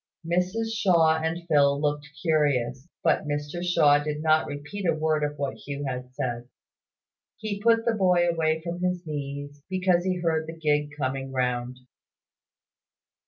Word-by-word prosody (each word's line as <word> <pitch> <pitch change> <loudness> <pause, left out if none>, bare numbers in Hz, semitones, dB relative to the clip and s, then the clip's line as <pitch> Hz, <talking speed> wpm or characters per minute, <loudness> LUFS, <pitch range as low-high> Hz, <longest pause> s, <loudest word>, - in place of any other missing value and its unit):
Mrs 180 +7 0
Shaw 170 -7 +4
and 165 +2 -2
Phil 140 -3 +4
looked 150 0 -1
curious; 140 -5 +1 0.2
but - - +2
Mr 145 +4 -3
Shaw 145 -5 +4
did 150 0 -3
not 155 0 +3
repeat 150 +7 -5
a 165 - +3
word 155 -1 +1
of 150 0 -2
what 140 -1 -2
Hugh 140 0 -6
had 125 -1 -5
said. 120 -1 -3 0.9
He 205 -2 -4
put 230 0 +3
the 235 - +2
boy 180 -4 +3
away 160 -1 +1
from 170 +1 -4
his 180 -1 -1
knees, 145 -1 -5
because 185 -2 +2
he 185 -1 0
heard 160 -2 0
the 165 0 -7
gig 150 -2 +1
coming 135 -1 -2
round. 125 -1 -1
155 Hz, 155 wpm, -26 LUFS, 145-175 Hz, 0.9 s, Shaw